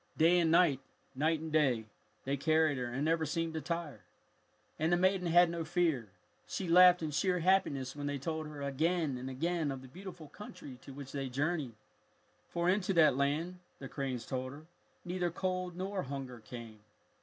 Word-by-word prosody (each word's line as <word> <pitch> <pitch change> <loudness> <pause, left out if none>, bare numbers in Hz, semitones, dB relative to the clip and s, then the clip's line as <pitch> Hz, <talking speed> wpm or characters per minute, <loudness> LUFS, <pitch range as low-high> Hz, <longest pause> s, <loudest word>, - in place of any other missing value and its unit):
Day 170 +3 +5
and 165 -2 +3
night, 165 -5 +4 0.3
night 155 +3 +1
and 160 -1 -6
day, 135 -8 +2 0.4
they 135 +1 0
carried 155 0 +2
her 125 - -2
and 130 +5 -2
never 165 0 +2
seemed 165 +1 -2
to 160 - -3
tire. 165 - -4 0.8
And 160 +2 +1
the 175 - +4
maiden 185 0 +2
had 175 +1 +6
no 170 -1 -3
fear. 160 - 0 0.4
She 190 - -3
laughed 180 0 +7
in 155 - -2
sheer 180 +5 +1
happiness 160 -8 +1
when 145 0 -4
they 145 0 -2
told 155 +3 -3
her 150 -2 -7
again 155 +1 0
and 125 +1 -5
again 160 +3 -1
of 135 -1 -6
the - - -10
beautiful 175 +1 -10
country 160 -11 -10
to - - -11
which 135 0 -9
they 135 -2 -3
journeyed. 145 -2 -1 0.7
For 170 0 -1
into 195 +1 +2
that 155 -5 +6
land, 155 +6 -1 0.2
the 135 - -8
cranes 130 -3 -4
told 130 0 -4
her, 150 +2 -12 0.4
neither 180 0 -1
cold 185 0 -3
nor 190 +1 -2
hunger 135 -4 -6
came. 115 -1 -10
155 Hz, 185 wpm, -33 LUFS, 135-175 Hz, 0.8 s, laughed